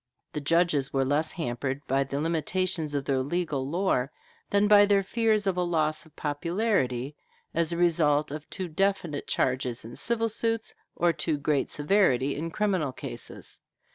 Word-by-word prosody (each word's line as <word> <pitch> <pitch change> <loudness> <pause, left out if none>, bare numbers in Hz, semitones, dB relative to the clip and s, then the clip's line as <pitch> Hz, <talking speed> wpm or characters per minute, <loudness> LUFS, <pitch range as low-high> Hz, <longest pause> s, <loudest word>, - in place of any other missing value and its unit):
The 150 - -3
judges 155 -2 +2
were 135 -1 +1
less 150 +3 +1
hampered 135 -3 -3
by 135 +1 +1
the 140 +1 -4
limitations 165 0 -1
of 140 -1 -1
their 135 -1 +1
legal 145 -1 -2
lore 160 -6 0 0.4
than 205 +1 +3
by 205 -1 +7
their 200 -1 +3
fears 215 0 +1
of 190 -2 0
a - - +2
loss 160 -2 0
of 160 - -24
popularity 145 - -1 0.4
as 165 0 +1
a 170 - -2
result 155 -4 +2
of 150 +1 -7
too 185 -2 -3
definite 175 -3 -1
charges 125 -3 0
in 115 - -9
civil 230 -1 +1
suits, 225 +1 -1 0.2
or 170 0 +2
too 160 -3 -1
great 145 -1 0
severity 145 -5 +2
in 165 +3 -3
criminal 185 -6 0
cases. - - -8
160 Hz, 165 wpm, -27 LUFS, 140-185 Hz, 0.4 s, by